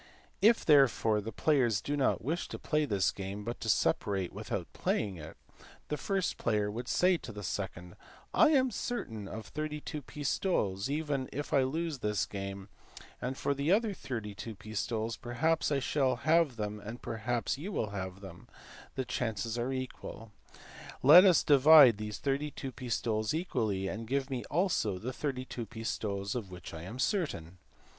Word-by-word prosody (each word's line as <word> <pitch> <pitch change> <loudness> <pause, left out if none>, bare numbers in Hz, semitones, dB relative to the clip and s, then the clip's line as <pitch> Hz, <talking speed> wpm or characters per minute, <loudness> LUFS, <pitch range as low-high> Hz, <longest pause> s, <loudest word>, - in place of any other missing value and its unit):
If 225 +3 +5
therefore 130 -7 +4
the 110 +2 -6
players 125 -10 +2
do 145 +7 -2
not 140 -2 +1
wish 165 +5 -2
to - - -6
play 150 -1 0
this 100 -7 +1
game, 100 +1 -6
but 115 +2 -5
to - - -3
separate 95 -3 +1
without - - -5
playing 100 -4 -1
it, 80 0 -10 0.5
the 150 - 0
first 195 +4 -1
player 105 -2 +1
would 120 +3 -5
say 180 +5 +3
to 125 - -9
the 105 -1 -8
second 85 -1 -5 0.4
"I - - +6
am 260 -4 +3
certain 115 - -4
of 110 +2 -7
32 150 +1 -5
pistoles 135 - -1
even 145 -3 -1
if 145 +2 -5
I 140 - +5
lose 155 +2 -2
this 105 -2 0
game, 100 0 -6 0.5
and 130 +1 -2
as - - -12
for 140 - +1
the 140 +4 0
other 215 +1 +3
32 110 - -6
pistoles 110 +2 -3
perhaps 155 +7 0
I 140 - +3
shall 135 -1 +1
have 155 +2 +2
them 105 -1 -4
and 110 +4 -8
perhaps 115 +2 -2
you 185 +8 -5
will 110 - -2
have 95 -1 -5
them; 95 -3 -11 0.5
the 130 - -2
chances 115 -2 -2
are 120 +3 -1
equal. 130 -4 -6 0.7
Let 170 +8 +10
us 180 -4 +5
then 145 - +6
divide 140 -5 +8
these 105 0 -4
32 140 -1 -2
pistoles 115 -2 -1
equally, 110 - -1
and 110 +4 -5
give 135 +2 -1
me 125 -3 -2
also 155 - 0
the 125 +7 -5
32 130 -4 -4
pistoles 105 -2 -3
of 115 -6 -4
which 90 -2 -9
I 80 - -7
am 100 +8 -7
certain." 130 - -2
120 Hz, 170 wpm, -31 LUFS, 105-145 Hz, 0.7 s, Let